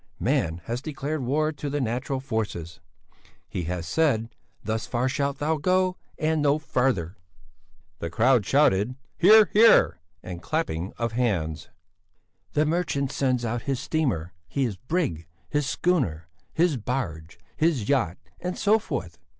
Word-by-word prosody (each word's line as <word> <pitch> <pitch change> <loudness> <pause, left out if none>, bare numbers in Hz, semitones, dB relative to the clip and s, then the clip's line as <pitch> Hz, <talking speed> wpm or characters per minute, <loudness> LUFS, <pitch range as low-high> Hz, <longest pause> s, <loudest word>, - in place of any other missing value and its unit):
Man 85 +1 0
has 120 +6 -3
declared 150 0 -3
war 150 +5 +1
to 145 -1 -5
the 145 +1 -1
natural 130 +2 -2
forces; 110 -10 -4 0.7
he 90 - -4
has 85 0 -3
said, 115 - +1 0.3
'Thus 110 +1 -2
far 125 +1 0
shalt 140 +1 -1
thou 155 +2 0
go 185 +3 +2 0.2
and 155 -1 +1
no 145 0 +3
farther!'" 125 - 0 0.8
"Hear! 130 - +4
hear!" 220 - +6 0.2
and 90 -1 -7
clapping 100 - -2
of 115 -1 -1
hands. 95 -11 -1 0.8
"The 150 - +3
merchant 155 -4 0
sends 130 -4 0
out 115 +1 -2
his 135 -2 0
steamer, 125 - -1
his 130 -7 -1
brig, 125 - -2 0.2
his 145 +2 0
schooner, 120 - 0 0.2
his 165 -4 +2
barge, 100 -10 -4 0.2
his 155 -10 +1
yacht, 115 -11 +1 0.2
and 180 +1 -4
so 215 +2 +4
forth. 85 - -5
130 Hz, 130 wpm, -26 LUFS, 95-155 Hz, 0.8 s, hear